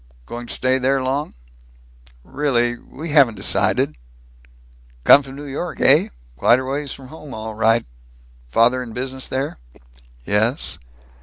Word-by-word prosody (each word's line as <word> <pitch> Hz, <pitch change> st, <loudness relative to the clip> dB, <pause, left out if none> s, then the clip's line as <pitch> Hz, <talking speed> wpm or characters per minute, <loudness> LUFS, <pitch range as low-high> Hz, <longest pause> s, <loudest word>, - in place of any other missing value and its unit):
"Going 120 Hz, -, -7 dB
to -, -, -3 dB
stay 130 Hz, +1 st, +1 dB
there 135 Hz, +1 st, +2 dB
long?" 135 Hz, +3 st, -2 dB, 0.9 s
"Really 120 Hz, -, 0 dB
We 155 Hz, +6 st, -9 dB
haven't 140 Hz, -7 st, +5 dB
decided." -, -, +1 dB, 1.1 s
"Come 140 Hz, -, +8 dB
from 135 Hz, -1 st, -11 dB
New 145 Hz, +1 st, -8 dB
York, 145 Hz, +5 st, -5 dB
eh? -, -, +5 dB, 0.3 s
Quite 120 Hz, -, +4 dB
a 130 Hz, -, -4 dB
ways 140 Hz, +1 st, -3 dB
from 130 Hz, -2 st, -9 dB
home, 150 Hz, -2 st, -10 dB
all 110 Hz, 0 st, -6 dB
right. 115 Hz, +1 st, +2 dB, 0.6 s
Father 115 Hz, -, +3 dB
in 120 Hz, -3 st, -8 dB
business 130 Hz, +2 st, -5 dB
there?" 135 Hz, -, -3 dB, 0.7 s
"Yes." 110 Hz, +6 st, 0 dB
130 Hz, 140 wpm, -20 LUFS, 120-140 Hz, 1.1 s, Come